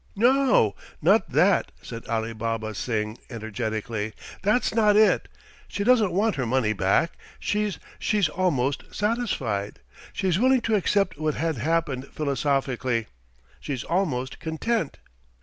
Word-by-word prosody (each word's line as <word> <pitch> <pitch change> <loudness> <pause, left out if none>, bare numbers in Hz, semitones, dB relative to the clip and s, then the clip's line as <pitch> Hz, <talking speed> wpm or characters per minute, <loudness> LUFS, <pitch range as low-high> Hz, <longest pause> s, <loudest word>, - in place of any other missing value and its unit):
"No. 250 - +4 0.3
Not - - +3
that!" - - +3
said 115 - -8
Alibaba 115 -1 -2
Singh 110 -1 -2
energetically. 110 -1 -3 0.3
"That's 210 +6 +2
not 210 -2 +4
it. 215 0 +4 0.4
She 200 - -3
doesn't 225 -4 +4
want 205 +3 +1
her 130 - 0
money 115 -3 +2
back. 95 - +2 0.3
She 210 0 0 0.3
she's 205 -5 +2
almost 145 -6 -1
satisfied. 205 - -1 0.3
She's 185 -2 0
willing 260 +1 +4
to 225 - -1
accept 195 -4 +1
what 155 -1 0
had 160 -2 -1
happened 140 0 -1
philosophically. 135 -5 -1 0.5
She's 135 -4 -4
almost 145 -8 -1
content. 165 +2 -2
145 Hz, 120 wpm, -25 LUFS, -, 0.5 s, No